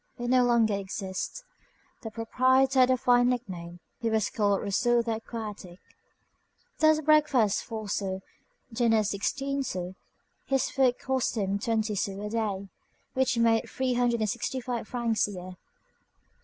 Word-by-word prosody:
It 240 0 -3
no 255 0 +5
longer 235 -3 +3
exists. 195 - -4 0.6
The 225 - -6
proprietor 260 +4 +2
had 255 0 +6
a 255 - +3
fine 245 -1 +4
nickname: 175 -8 -4 0.2
he 230 -2 -1
was 220 -2 0
called 205 -5 +1
Rousseau 235 +4 +2
the 225 -1 -1
Aquatic. 210 -6 -7 1.0
Thus, 310 0 +5
breakfast 290 -8 +3
four 220 -2 -6
sous, 190 -1 -2 0.5
dinner 225 -2 +3
sixteen 275 +8 -2
sous; 180 -7 -4 0.5
his 270 -1 +1
food 255 -3 +2
cost 260 -2 -1
him 200 -1 0
twenty 220 0 0
sous 195 -1 -2
a 210 +1 -5
day; 205 -4 -2 0.5
which 260 -2 +1
made 230 -1 +2
three 260 -1 -1
hundred 240 -1 +1
and 215 - +1
sixty 260 - -3
five 240 -3 -4
francs 235 -4 0
a 205 - -7
year. 180 0 -8
230 Hz, 150 wpm, -28 LUFS, 205-255 Hz, 1.0 s, had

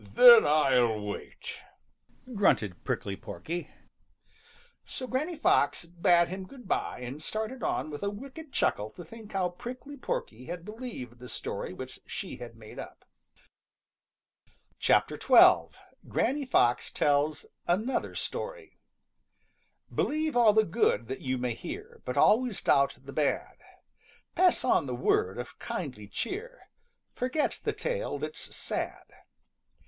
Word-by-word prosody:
"Then 480 -3 +10
I'll 125 -7 +4
wait," 105 0 -6 0.7
grunted 115 - +2
Prickly 100 - -2
Porky. 170 - -6 1.1
So 260 - -6
Granny 290 +7 -2
Fox 175 - +2
bade 170 0 +3
him 190 +1 -6
good 245 -4 -13
by 125 - -1
and 130 +5 -6
started 220 +8 -3
on 155 - -1
with 145 - -6
a 200 - 0
wicked 270 +8 -9
chuckle 105 - +1
to 175 - -10
think 215 +4 -12
how 185 -2 +1
Prickly 255 +10 -8
Porky 125 - -4
had 175 +2 -6
believed 210 - -7
the 125 0 -9
story - - -4
which - - -8
she - - -6
had 120 -1 -9
made 110 -1 -11
up. - - -10 1.8
XII. - - +5 1.1
GRANNY 275 +4 0
FOX 120 - +3
TELLS 145 +1 +1 0.2
ANOTHER 215 +9 0
STORY - - -5 1.1
Believe 310 0 0
all 230 -3 +6
the 220 0 +5
good 115 - +1
that 130 - -4
you 130 0 -1
may 125 -1 -1
hear, 430 - -8
But - - -3
always 235 -1 +4
doubt 140 0 +3
the 140 0 -9
bad. 150 -2 0 0.8
Pass 365 -6 +4
on 165 - +3
the 125 - -2
word 95 -5 +1
of 125 - -7
kindly 140 - -5
cheer; 435 - -5 0.4
Forget 260 +4 -1
the - - +1
tale - - -2
that's - - -6
sad. - - -4
185 Hz, 130 wpm, -29 LUFS, -, 1.8 s, Then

